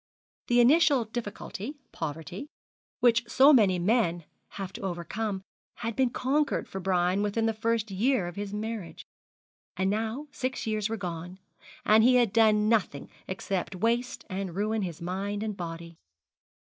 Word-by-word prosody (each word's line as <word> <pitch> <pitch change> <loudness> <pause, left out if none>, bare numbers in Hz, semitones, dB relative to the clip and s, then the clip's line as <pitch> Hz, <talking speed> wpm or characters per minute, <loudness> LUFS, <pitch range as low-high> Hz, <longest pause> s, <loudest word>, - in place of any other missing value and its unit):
The 240 0 +4
initial 280 -1 +5
difficulty 220 +3 -6 0.2
poverty, 160 - -5 0.5
which 230 -1 +4
so 275 +3 +7
many 200 -8 +5
men 175 -3 +1 0.3
have 195 -1 -5
to - - -8
overcome, 195 +2 -3 0.3
had 230 -2 -4
been 260 -2 +3
conquered 285 +5 0
for 195 - -6
Brian 185 +1 +1
within 210 +2 0
the 225 - +1
first 225 -1 -1
year 220 0 +1
of 175 - -7
his 200 0 -4
marriage. 210 -3 -5 0.7
And 190 +1 +1
now 225 +7 -2
six 255 -2 -3
years 215 -1 -1
were 225 - -2
gone, 180 -1 -6 0.5
and 220 +1 +6
he 250 +2 +6
had 240 -5 +3
done 215 -2 +4
nothing 200 -11 0 0.2
except 190 0 -3
waste 235 +6 -1
and 190 -3 -4
ruin 215 +2 0
his 170 -3 -5
mind 200 +4 -3
and 215 -2 -3
body. 170 -2 -7
210 Hz, 150 wpm, -28 LUFS, 185-230 Hz, 0.7 s, so